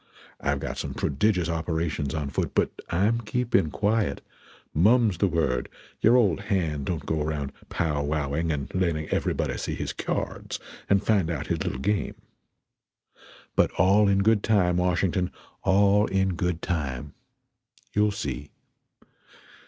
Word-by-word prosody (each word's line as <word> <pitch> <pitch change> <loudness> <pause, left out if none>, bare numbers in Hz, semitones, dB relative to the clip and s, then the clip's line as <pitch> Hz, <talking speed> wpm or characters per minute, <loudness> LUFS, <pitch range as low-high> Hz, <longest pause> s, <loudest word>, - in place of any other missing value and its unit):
I've 70 0 0
got - - -4
some - - -4
prodigious 90 +5 +1
operations 80 -3 -2
on 75 -3 -3
foot; - - -2
but - - +2 0.2
I'm 105 +7 +2
keeping 115 -6 +1
quiet; 105 +5 0 0.5
mum's 105 +2 +4
the 100 - +3
word; 80 -8 0 0.3
your 115 +3 +5
old 100 -8 +3
hand 85 -9 -1
don't 85 -4 -2
go 80 -1 -1
around 75 -2 -2 0.2
pow 75 -3 0
wowing 75 +2 -1
and 70 -3 -4
letting 85 -4 0
everybody - - -1
see - - -3
his - - -4
k'yards - - -3 0.3
and 100 0 +3
find 100 -7 +2
out 80 -5 -3
his - - -3
little - - -2
game. 100 +10 -1 1.4
But - - +4
all 100 +4 +4
in 100 0 +3
good 110 -1 +4
time, 90 -6 +2
Washington, 90 0 +1 0.3
all 100 +2 +4
in 95 0 +1
good 90 -1 -2
time. 75 -5 -3 0.8
You'll 105 0 +3
see. 75 - -4
90 Hz, 140 wpm, -26 LUFS, 75-100 Hz, 1.4 s, your